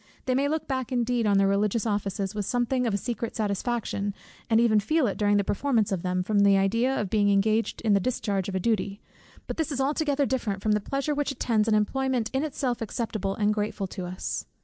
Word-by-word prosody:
They 255 - +1
may 275 +2 +2
look 310 +1 -2
back 260 -2 -2
indeed 240 -2 +1
on 200 -1 +4
their 195 0 +4
religious 205 +3 +1
offices 200 -2 -2
with 205 -2 -3
something 245 +1 0
of 220 - 0
a - - +1
secret 230 +1 -4
satisfaction, 205 -1 -2 0.3
and 225 -1 +4
even 225 -2 +4
feel 310 +8 +1
it 205 - -1
during 205 -1 +2
the 200 - +2
performance 225 0 0
of 190 -3 -1
them, 180 0 -1
from 205 +2 +1
the 200 -1 +5
idea 230 +7 +1
of 205 -3 -3
being 205 -2 +3
engaged 215 +3 +1
in 220 -3 +2
the 200 - +4
discharge 200 -4 -1
of 190 - -4
a - - +1
duty; 205 -1 -1 0.5
but - - -5
this 320 -2 -1
is 275 - -2
altogether 285 0 +1
different 215 -7 -2
from 215 - +2
the 210 - +3
pleasure 275 +6 -2
which 290 -1 -1
attends 230 -5 0
an 220 - +3
employment 250 +2 0
in 265 +2 +1
itself 265 -5 -2
acceptable 215 -3 -3
and 210 0 +2
grateful 210 -1 -2
to 185 -1 -6
us. 180 +1 -4
220 Hz, 225 wpm, -26 LUFS, 200-255 Hz, 0.5 s, the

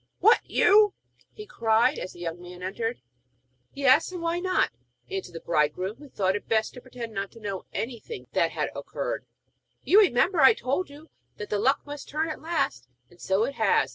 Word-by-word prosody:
'What, 445 +4 +6
you?' 415 -1 +5 0.4
he 425 - -10
cried, 235 - +2
as 185 - -6
the 175 - -13
young 170 0 -4
man 180 0 -10
entered. 225 +5 -3 0.8
'Yes, 275 +4 +4
I. - - -7
Why 335 0 -1
not?' 370 - +1 0.4
asked 190 -2 -4
the 165 - -7
bridegroom, 170 +6 0
who 290 -1 -13
thought 190 -5 0
it 205 - -5
best 220 -1 +1
to 250 - -10
pretend 240 -3 -8
not 195 0 -3
to 230 - -13
know 200 -3 -5
anything 255 - -5
that - - +2
had - - -2
occurred. - - -4 0.6
'You 405 - +6
remember, 360 - +3
I 265 - +8
told 280 +8 -2
you 295 +3 -14 0.3
that 210 - -7
the 205 - +1
luck 270 +6 +2
must 290 -1 -8
turn 315 +3 -1
at 310 - -6
last, 300 - -1 0.2
and 175 - -19
so 190 +3 +1
it 270 +4 -2
has. - - +2
240 Hz, 195 wpm, -26 LUFS, 195-310 Hz, 0.8 s, I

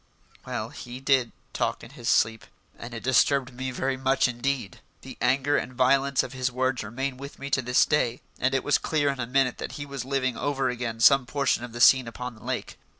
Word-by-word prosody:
Well, 120 -3 -3
he 120 +1 -9
did 135 -3 +2 0.2
talk - - -1
in - - -11
his - - -4
sleep 110 0 +2 0.3
and 115 0 -8
it 115 - -7
disturbed 130 0 +2
me 130 +1 -4
very 130 +1 -2
much 135 +1 +2
indeed. 125 -4 -3 0.2
The - - -10
anger 135 +3 +2
and 130 - -3
violence 135 +2 +3
of 130 - -7
his 130 0 -1
words 130 -1 -1
remain 130 +4 -4
with 140 +2 -9
me 140 0 -7
to 130 - +2
this 125 +1 +3
day, 125 -5 +1 0.2
and 130 +2 +1
it 135 - 0
was 145 - +2
clear 145 -3 0
in 135 - -7
a 120 - -2
minute 130 0 +1
that - - -5
he 145 - -6
was 140 -3 -5
living 130 -1 -1
over 135 0 -1
again 115 -2 -4
some 135 0 +6
portion 140 -2 0
of 120 - -7
the 120 - -7
scene 130 0 +6
upon 125 +2 -6
the 110 - -17
lake. - - -4
130 Hz, 220 wpm, -26 LUFS, 120-135 Hz, 0.3 s, some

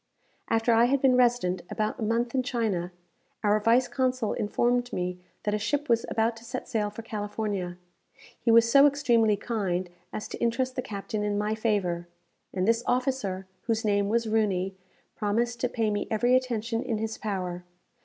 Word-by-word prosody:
After 225 +1 +2
I 230 +1 +5
had 275 +3 +2
been 260 -1 +4
resident 240 -8 +2
about 215 +4 -2
a - - -6
month 230 +2 0
in 260 - +2
China, 215 -8 -1 0.5
our 210 0 +3
vice 235 +4 +3
consul 255 -4 0
informed 240 +3 0
me 180 0 -3 0.2
that 210 - 0
a 210 - 0
ship 290 +8 -1
was 230 -1 +2
about 225 +1 +1
to 225 - -13
sail 230 -3 -2
for 215 +2 -9
California. 205 -4 -3 0.7
He 230 - +1
was 230 0 +7
so 275 +4 +7
extremely 240 -7 +3
kind 185 -6 -2 0.2
as 215 - -5
to - - -7
interest 255 +2 0
the - - -1
captain 210 0 -4
in 205 -1 0
my 210 +1 0
favour, 200 -6 -1 0.4
and 185 +1 -1
this 230 +1 +3
officer, 245 -7 0 0.2
whose 225 -1 0
name 200 -1 +2
was 230 +1 +1
Rooney, 195 -4 +1 0.4
promised 235 +3 0
to 250 - 0
pay 225 -3 0
me 205 0 -2
every 240 +3 +3
attention 235 -2 0
in 235 -4 -2
his 220 +1 -4
power. 180 -4 -3
225 Hz, 175 wpm, -27 LUFS, 205-240 Hz, 0.7 s, was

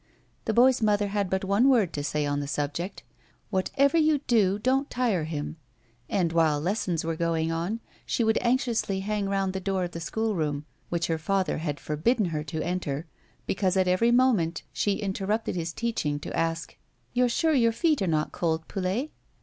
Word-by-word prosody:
The 220 - 0
boy's 255 +1 +5
mother 205 -1 +2
had 200 -2 -1
but 190 +1 -1
one 205 +7 +4
word 225 -10 +3
to 145 - -3
say 150 0 -1
on 145 0 0
the 145 - -3
subject 150 +6 -3 0.2
— - - -33
" - - -40
Whatever 275 - +2
you 305 -2 +3
do, 205 -5 +3
don't 265 +5 +1
tire 225 -10 0
him," 155 0 -4 0.5
and, 170 -4 +1
while 160 -3 +3
lessons 180 0 -1
were 165 0 -1
going 165 -1 0
on, 175 +8 -2 0.2
she 235 - 0
would 220 0 +3
anxiously 235 -6 +1
hang 205 0 -1
round 195 -1 0
the 190 - -2
door 190 -1 -1
of 175 - -3
the 165 - -6
schoolroom, 165 -7 -1 0.2
which 170 -1 0
her 165 -1 -1
father 190 +2 0
had 150 -3 -3
forbidden 200 - +1
her 155 -3 -2
to 160 -2 -3
enter 170 -4 -2 0.4
because, 190 -1 0
at 185 -1 +3
every 185 +6 +3
moment, 235 -10 +3
she 205 -1 0
interrapted 205 +2 -1
his 170 -1 -3
teaching 165 -9 -2
to - - -5
ask: 165 0 -2 0.2
" - - -41
You're 245 0 +3
sure 320 +6 +2
your 235 -5 +4
feet 305 +2 +1
are 190 - +1
not 155 -2 0
cold, 160 -2 -1
Poulet 200 +10 -2
190 Hz, 195 wpm, -27 LUFS, 165-225 Hz, 0.5 s, boy's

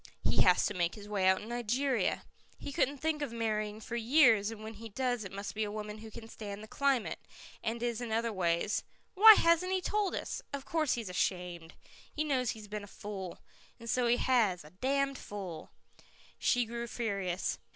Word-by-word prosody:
"He - - +3
has 180 -1 +5
to - - -1
make 175 -3 0
his 205 -1 -10
way 200 -3 +1
out 190 +1 +3
in - - -9
Nigeria. 245 +2 0 0.3
He 285 - -7
couldn't 280 +1 +1
think 305 +1 -1
of 285 -5 -2
marrying 215 -2 -2
for 230 - -6
years 235 -4 +5
and 220 -1 -8
when 220 +1 -6
he 225 +1 -9
does 245 +1 -1
it 190 - -7
must 200 +1 -5
be 220 - -1
a 205 - -3
woman 210 0 -6
who 220 0 -9
can 225 +1 -10
stand 210 -2 -7
the - - -9
climate, 275 -2 0 0.4
and 230 +1 -2
is 240 -1 -1
in 235 -2 -4
other 230 0 0
ways 175 +1 0 0.3
Why 435 +3 +10
hasn't 335 +1 +3
he 380 - +2
told 410 0 0
us? - - -4
Of 280 -1 -4
course 315 -5 +1
he's 230 -3 -3
ashamed. 180 -2 -2 0.4
He 305 - -1
knows 260 -5 0
he's 215 -3 -5
been 210 0 -5
a - - -9
fool. 195 -3 -7 0.4
And 230 - -10
so 245 +1 +2
he 240 +1 +4
has 220 - +2
a 150 - -14
damned 275 +6 0
fool." 185 -6 -7 0.7
She 245 -2 +2
grew 235 +1 -5
furious. 200 -6 -2
225 Hz, 205 wpm, -32 LUFS, 205-255 Hz, 0.7 s, Why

